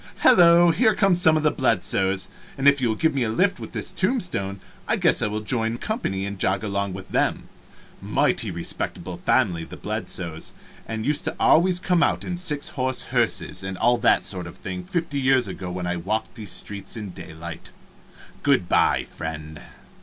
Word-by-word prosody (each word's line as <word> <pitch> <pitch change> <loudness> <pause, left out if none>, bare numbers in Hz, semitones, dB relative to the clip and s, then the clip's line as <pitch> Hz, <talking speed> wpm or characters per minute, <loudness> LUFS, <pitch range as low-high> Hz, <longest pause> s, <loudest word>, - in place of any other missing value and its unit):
Hello, 170 -1 +7
here 220 +6 +2
are 195 -2 +4
some 160 -3 +5
of 155 - -2
the 150 - +3
Bledsoes, 95 -6 +1 0.3
and 135 +1 +1
if 140 -1 +5
you 125 - +2
will 110 - 0
give 160 +5 +1
me 135 - -1
a 115 - 0
lift 185 - +1
with - - -8
this - - -2
tombstone 180 - -1 0.3
I - - +2
guess - - +3
I - - +1
will 105 +1 -3
join 115 +1 0
company 110 - -3
and 100 -1 -6
jog 95 +1 +1
along 100 -2 -2
with 95 0 -9
them - - -1 0.5
mighty - - +1
respectable 85 0 -2
old - - -9
family, 85 -2 +1
the - - -10
Bledsoes, 80 -2 -3 0.3
and 110 -1 -4
used 150 0 +1
to - - -3
always 180 +2 +4
come 180 -2 +1
out - - +1
in 180 - -3
six 150 -5 -1
horse 130 -1 -2
hearses - - 0
and 95 0 -5
all 120 +3 +2
that - - +3
sort 90 -3 -3
of 85 +1 -11
thing 90 -2 -6
fifty 165 - -3
years 130 -3 +2
ago 95 -1 -6
when 90 0 -4
I 90 0 -2
walked 110 +6 -3
these 110 -5 -6
streets 100 +1 -4
in 105 -4 -6
daylight. 80 -1 -9 0.7
Good 140 -11 +2
by, - - +2
friend." 80 -1 -7
110 Hz, 190 wpm, -23 LUFS, 95-155 Hz, 0.7 s, Hello